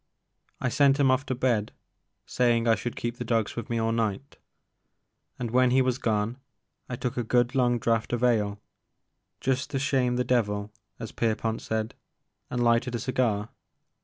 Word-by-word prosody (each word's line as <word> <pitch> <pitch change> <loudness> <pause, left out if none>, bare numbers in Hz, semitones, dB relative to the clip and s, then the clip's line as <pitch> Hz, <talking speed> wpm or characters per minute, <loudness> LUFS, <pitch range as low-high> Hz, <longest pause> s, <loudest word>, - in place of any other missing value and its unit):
I 125 - 0
sent 140 +3 +3
him 135 -2 +4
off 130 +2 0
to 130 - -1
bed, 120 -4 0 0.5
saying 120 -2 +1
I 115 - +6
should 120 +1 -3
keep 120 0 -4
the 125 - -4
dogs 115 -3 0
with 120 - -5
me 120 - -1
all 115 0 +1
night; 115 +3 -2 1.0
and 120 -3 -4
when 130 +1 +4
he 130 +1 +4
was 130 -1 0
gone, 110 +2 0 0.5
I 125 - -3
took 125 +1 -4
a 120 - 0
good 120 +2 +2
long 125 -2 +2
draught 115 -1 0
of 120 0 -1
ale, 105 -4 +2 0.4
*' - - -53
just 130 0 0
to 135 - -2
shame 130 -2 +1
the 125 - +1
devil," 105 -4 0 0.3
as 115 -2 -7
Pierpont 115 0 -1
said, 110 0 -2 0.6
and 125 -1 -1
lighted 120 +1 +2
a - - -2
cigar. 115 -4 0
120 Hz, 180 wpm, -27 LUFS, 115-125 Hz, 1.0 s, I